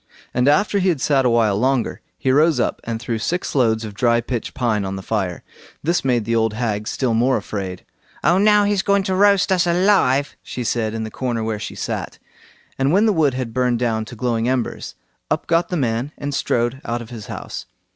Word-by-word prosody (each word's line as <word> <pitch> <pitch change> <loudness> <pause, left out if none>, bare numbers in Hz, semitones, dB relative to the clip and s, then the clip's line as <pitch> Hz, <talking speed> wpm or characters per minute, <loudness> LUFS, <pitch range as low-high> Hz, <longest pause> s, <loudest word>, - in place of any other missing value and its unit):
And 125 +2 +2
after 200 +7 +3
he 190 0 +2
had 165 -6 0
sat 135 0 +2
a - - +4
while 115 -4 +3
longer, 130 0 0 0.2
he 130 - +1
rose 150 0 +4
up - - -1
and 115 -1 -3
threw 115 -1 -3
six 175 +10 -2
loads 115 -4 +2
of 105 - -7
dry 115 +2 +2
pitch 120 -1 -4
pine 115 -6 0
on 95 0 -3
the 95 - -7
fire. 95 -5 -2 0.4
This 170 +4 +1
made 120 -4 +1
the 115 +1 0
old 110 -1 +1
hag 110 -3 -2
still 130 -4 0
more 125 +4 +3
afraid. 95 -3 -5 0.4
"Oh! 175 +4 +4
now 210 0 +5
he's 205 -1 +1
going 200 0 +2
to 190 - -1
roast 200 0 +4
us 180 -2 +3
alive", 170 -7 +3
she 125 - -5
said, 110 -1 -1
in 110 - -3
the 110 - -6
corner 120 -3 -2
where 110 -1 -2
she 105 - -6
sat. - - -4 0.6
And 135 +2 +2
when 200 +5 +4
the 215 - +3
wood 150 -7 +2
had 125 -3 -4
burned 125 -1 +1
down 115 -2 -1
to 120 - -10
glowing 115 0 0
embers, 130 -2 -2 0.3
up - - -1
got 170 +1 +1
the 180 - -1
man 125 +1 -1
and 145 0 -4
strode 120 0 0
out 120 0 -3
of 115 - -14
his 110 -3 -8
house. - - -7
125 Hz, 220 wpm, -20 LUFS, 115-155 Hz, 0.6 s, now